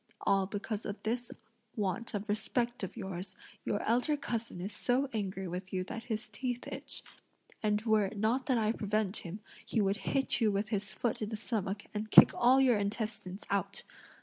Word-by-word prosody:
All 195 Hz, -1 st, +3 dB
because 205 Hz, +2 st, -3 dB
of 205 Hz, -1 st, -4 dB
this 240 Hz, +2 st, -1 dB, 0.4 s
want 210 Hz, +1 st, -1 dB
of 205 Hz, +2 st, -3 dB
respect 235 Hz, +3 st, 0 dB
of 190 Hz, +3 st, -5 dB
yours, 190 Hz, -2 st, -5 dB, 0.3 s
your 205 Hz, -, -1 dB
elder 250 Hz, +6 st, +2 dB
cousin 230 Hz, -8 st, -3 dB
is 195 Hz, +4 st, -4 dB
so 260 Hz, +3 st, +1 dB
angry 195 Hz, -3 st, -2 dB
with 180 Hz, +1 st, -5 dB
you 185 Hz, -1 st, 0 dB
that 225 Hz, +4 st, -6 dB
his 220 Hz, -2 st, -3 dB
teeth 245 Hz, +3 st, -3 dB
itch; -, -, -7 dB, 0.6 s
and 210 Hz, 0 st, +1 dB
were 220 Hz, -2 st, +4 dB
it 200 Hz, +2 st, -5 dB
not 230 Hz, +5 st, +1 dB
that 260 Hz, -3 st, +3 dB
I 220 Hz, -1 st, +2 dB
prevent 210 Hz, -2 st, 0 dB
him, 190 Hz, +4 st, -6 dB, 0.2 s
he 230 Hz, -, -1 dB
would 200 Hz, 0 st, +2 dB
hit 270 Hz, +2 st, 0 dB
you 215 Hz, -2 st, +4 dB
with 200 Hz, +2 st, -1 dB
his 205 Hz, -3 st, -1 dB
foot 230 Hz, +1 st, -1 dB
in 210 Hz, -, -1 dB
the 220 Hz, -, -3 dB
stomach 210 Hz, -3 st, -2 dB
and 215 Hz, +1 st, -3 dB
kick -, -, +10 dB
all 250 Hz, +2 st, +5 dB
your 250 Hz, -5 st, +5 dB
intestines 205 Hz, -2 st, -2 dB
out! 200 Hz, -2 st, -1 dB
215 Hz, 190 wpm, -32 LUFS, 200-235 Hz, 0.6 s, kick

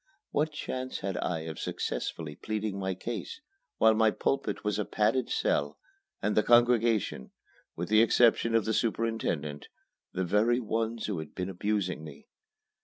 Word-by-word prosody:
What 155 Hz, +2 st, +1 dB
chance 130 Hz, -3 st, -4 dB
had 95 Hz, -1 st, -2 dB
I 85 Hz, -3 st, -1 dB
of 80 Hz, -2 st, -6 dB
successfully 75 Hz, -2 st, -3 dB
pleading 105 Hz, 0 st, -3 dB
my 95 Hz, -1 st, -2 dB
case, 115 Hz, -, -5 dB, 0.4 s
while 110 Hz, -, +6 dB
my 110 Hz, 0 st, +4 dB
pulpit 125 Hz, -1 st, -1 dB
was 105 Hz, 0 st, 0 dB
a -, -, +1 dB
padded 115 Hz, +4 st, +1 dB
cell, 75 Hz, 0 st, 0 dB, 0.5 s
and 105 Hz, -, +1 dB
the 105 Hz, -, +5 dB
congregation 120 Hz, -, +3 dB, 0.5 s
with 85 Hz, +1 st, -4 dB
the 110 Hz, +1 st, +6 dB
exception 115 Hz, 0 st, +4 dB
of 110 Hz, -3 st, +3 dB
the 110 Hz, -, 0 dB
superintendent 110 Hz, -11 st, -1 dB, 0.4 s
the 95 Hz, -, -2 dB
very 110 Hz, +7 st, +3 dB
ones 115 Hz, 0 st, -2 dB
who 100 Hz, -6 st, -2 dB
had 80 Hz, -, -8 dB
been 90 Hz, 0 st, -3 dB
abusing 95 Hz, -3 st, -1 dB
me? 75 Hz, -3 st, -11 dB
105 Hz, 155 wpm, -29 LUFS, 90-115 Hz, 0.5 s, while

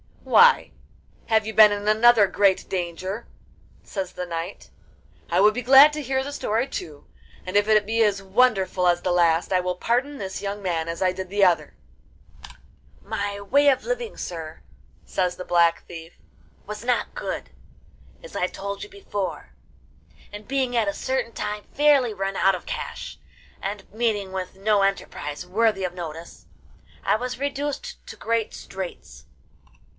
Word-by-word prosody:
'Why, 480 Hz, +1 st, +5 dB, 0.6 s
have 220 Hz, -2 st, +2 dB
you 220 Hz, -, -4 dB
been 215 Hz, -1 st, +8 dB
in 205 Hz, 0 st, -3 dB
another 220 Hz, 0 st, +6 dB
great 195 Hz, -1 st, +2 dB
danger?' 185 Hz, +4 st, -4 dB, 0.6 s
says 190 Hz, -2 st, -5 dB
the 180 Hz, -, -5 dB
knight. 170 Hz, +2 st, -6 dB, 0.6 s
'I 175 Hz, +2 st, +2 dB
would 210 Hz, +1 st, +6 dB
be 250 Hz, -, -3 dB
glad 270 Hz, +4 st, +8 dB
to 300 Hz, -, -3 dB
hear 265 Hz, -1 st, -1 dB
the 285 Hz, -, -6 dB
story 235 Hz, -3 st, -1 dB
too, 155 Hz, -, -7 dB, 0.4 s
and 185 Hz, +1 st, -6 dB
if 205 Hz, 0 st, +3 dB
it 215 Hz, -1 st, +4 dB
be 225 Hz, +2 st, 0 dB
as 200 Hz, -2 st, +1 dB
wonderful 195 Hz, -3 st, +2 dB
as 175 Hz, 0 st, +3 dB
the 180 Hz, -, -1 dB
last, 170 Hz, -1 st, +2 dB
I 185 Hz, -, +3 dB
will 180 Hz, 0 st, -2 dB
pardon 250 Hz, +9 st, -1 dB
this 190 Hz, -5 st, -5 dB
young 205 Hz, +1 st, -4 dB
man 170 Hz, -4 st, -2 dB
as 165 Hz, 0 st, -5 dB
I 185 Hz, -, +3 dB
did 185 Hz, 0 st, -6 dB
the 200 Hz, +1 st, +1 dB
other.' 165 Hz, -5 st, +2 dB, 1.3 s
'My 205 Hz, -1 st, -3 dB
way 285 Hz, +8 st, +3 dB
of 265 Hz, -, +1 dB
living, -, -, -3 dB
sir,' 160 Hz, -3 st, -7 dB, 0.4 s
says 180 Hz, -1 st, -1 dB
the 180 Hz, -, -8 dB
Black 170 Hz, -1 st, +3 dB
Thief, 165 Hz, 0 st, -10 dB, 0.5 s
'was 210 Hz, +1 st, -7 dB
not 245 Hz, 0 st, 0 dB
good, -, -, -5 dB, 0.7 s
as -, -, -12 dB
I 180 Hz, -, +1 dB
told 200 Hz, +1 st, -6 dB
you 415 Hz, -, -9 dB
before; 205 Hz, -, -5 dB, 0.8 s
and 205 Hz, 0 st, -10 dB
being 260 Hz, -2 st, -1 dB
at 225 Hz, -3 st, +2 dB
a 200 Hz, -, 0 dB
certain 260 Hz, -1 st, -2 dB
time 210 Hz, -1 st, -4 dB
fairly 280 Hz, -5 st, +4 dB
run 195 Hz, -1 st, -3 dB
out 195 Hz, 0 st, +3 dB
of 180 Hz, -, -9 dB
cash, -, -, -6 dB, 0.4 s
and 200 Hz, 0 st, -6 dB
meeting 215 Hz, -4 st, -1 dB
with 190 Hz, -1 st, -5 dB
no 205 Hz, +1 st, +2 dB
enterprise 180 Hz, -5 st, -2 dB
worthy 210 Hz, +1 st, +1 dB
of 180 Hz, -1 st, -2 dB
notice, 165 Hz, -1 st, -8 dB, 0.6 s
I -, -, +2 dB
was 250 Hz, +2 st, -4 dB
reduced 285 Hz, -, -4 dB
to -, -, -8 dB
great 230 Hz, -1 st, -2 dB
straits. 90 Hz, -, -8 dB
200 Hz, 165 wpm, -24 LUFS, 180-240 Hz, 1.3 s, been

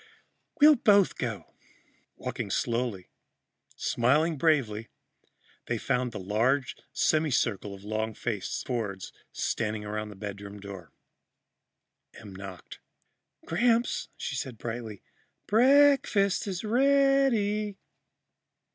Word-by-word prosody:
"We'll 300 Hz, 0 st, +8 dB
both 205 Hz, -4 st, +4 dB
go." 110 Hz, -9 st, -5 dB, 0.6 s
Walking -, -, -5 dB
slowly, 115 Hz, -6 st, -2 dB, 0.6 s
smiling 150 Hz, +7 st, +2 dB
bravely, 130 Hz, -8 st, +1 dB, 0.8 s
they -, -, -1 dB
found 125 Hz, -1 st, -1 dB
a -, -, -2 dB
large 120 Hz, +8 st, 0 dB, 0.2 s
semi 155 Hz, 0 st, +2 dB
circle 105 Hz, -6 st, -1 dB
of 95 Hz, -, -14 dB
long 110 Hz, +1 st, -3 dB
faced 105 Hz, -6 st, -3 dB
Fords 105 Hz, -7 st, -4 dB, 0.2 s
standing 105 Hz, -1 st, -2 dB
around 105 Hz, +1 st, -4 dB
the 105 Hz, -, -10 dB
bedroom 100 Hz, 0 st, -7 dB
door. 100 Hz, -4 st, -10 dB, 1.2 s
Em 100 Hz, -3 st, -11 dB
knocked. 95 Hz, -2 st, -10 dB, 0.7 s
"Gramps," 235 Hz, +7 st, +1 dB
she 140 Hz, -, -4 dB
called 130 Hz, -3 st, -5 dB
brightly, 115 Hz, -3 st, -6 dB, 0.4 s
"break 275 Hz, +5 st, +5 dB
fast 200 Hz, -1 st, +1 dB
is 185 Hz, -1 st, -3 dB
rea 275 Hz, +4 st, +4 dB
dy." 210 Hz, -3 st, -1 dB
125 Hz, 105 wpm, -28 LUFS, -, 1.2 s, We'll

